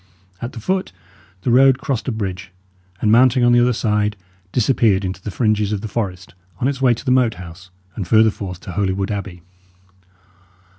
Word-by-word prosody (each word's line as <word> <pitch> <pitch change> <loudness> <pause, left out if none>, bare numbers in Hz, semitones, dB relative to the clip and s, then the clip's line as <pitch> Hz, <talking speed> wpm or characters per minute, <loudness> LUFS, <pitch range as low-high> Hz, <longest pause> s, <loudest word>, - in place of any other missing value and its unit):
At 120 - -5
the 115 - -7
foot, 185 - -2 0.5
the 125 - +1
road 135 +1 +5
crossed 130 -3 -3
a - - 0
bridge, 95 -5 -5 0.5
and 105 - +2
mounting 125 +2 +5
on 120 - +5
the 120 - +5
other 120 +1 +3
side, 105 -2 0 0.3
disappeared 110 -5 +2
into 95 0 -5
the 105 - -6
fringes 105 -1 0
of 105 -2 -2
the 110 - -5
forest 95 -4 -4 0.3
on 125 - +1
its 135 -1 -2
way 125 -3 +4
to 110 - -11
the 130 - +1
Moat 125 -4 +3
House, 90 +1 -11 0.3
and 95 -5 -5
further 110 +2 +5
forth 90 -4 -7
to - - -8
Holywood 95 +1 -1
Abbey. 95 -4 -6
110 Hz, 190 wpm, -19 LUFS, 95-125 Hz, 0.5 s, road